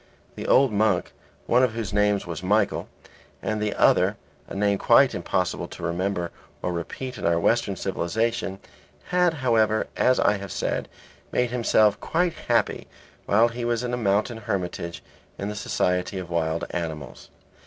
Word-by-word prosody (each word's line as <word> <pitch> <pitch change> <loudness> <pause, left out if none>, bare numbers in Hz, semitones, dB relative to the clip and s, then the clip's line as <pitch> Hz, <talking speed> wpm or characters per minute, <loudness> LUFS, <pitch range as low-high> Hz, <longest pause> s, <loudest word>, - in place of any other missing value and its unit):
The - - -6
old 135 -2 +5
monk, 105 -3 +1 0.3
one 120 +2 +4
of 125 -3 +2
whose 110 -4 -4
names 105 -1 +2
was 85 -2 -5
Michael, 100 +2 +1 0.5
and 110 -1 -2
the 105 -1 -1
other - - +4 0.3
a - - -8
name 100 0 +1
quite - - +5
impossible - - -1
to - - -10
remember 90 +1 -1 0.3
or 90 - -1
repeat 125 +10 -5
in - - -4
our 85 0 +3
Western 115 +1 +1
civilization, 100 +3 -1 0.5
had, 180 -2 +3
however, 110 -2 +3
as 130 - +3
I 105 - +3
have 100 -2 -7
said, - - -2 0.4
made 125 -1 +1
himself 110 -4 +3
quite 175 0 0
happy - - 0 0.4
while 110 +4 +4
he 120 +1 -5
was 120 0 0
in 125 0 -3
a - - 0
mountain 110 +1 +1
hermitage 90 -5 -4 0.3
in 100 - -3
the 105 - -5
society 90 -1 -1
of 90 -2 -6
wild 80 0 0
animals. 80 -6 -5
105 Hz, 160 wpm, -25 LUFS, 90-115 Hz, 0.5 s, old